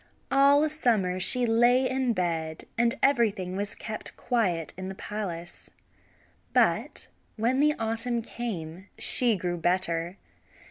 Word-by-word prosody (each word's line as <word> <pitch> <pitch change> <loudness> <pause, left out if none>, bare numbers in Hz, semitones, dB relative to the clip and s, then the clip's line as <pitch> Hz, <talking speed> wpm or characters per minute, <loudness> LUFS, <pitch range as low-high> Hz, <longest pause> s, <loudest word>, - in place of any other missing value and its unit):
All 280 +2 +4
summer 225 -12 0
she 245 +6 +5
lay 240 +3 +3
in 260 -2 0
bed, 165 -4 -3
and 235 0 +1
everything 215 -9 +1
was 200 +1 -4
kept 215 -1 -6
quiet 190 -10 -1
in 185 0 -6
the 190 - -7
palace; 180 -5 -7 0.8
but - - +1 0.3
when 235 +4 0
the 300 +1 +3
autumn 230 +1 -1
came 190 -7 -6
she 240 -3 +5
grew 175 -2 -3
better. 175 0 -1
215 Hz, 125 wpm, -27 LUFS, 180-245 Hz, 0.8 s, she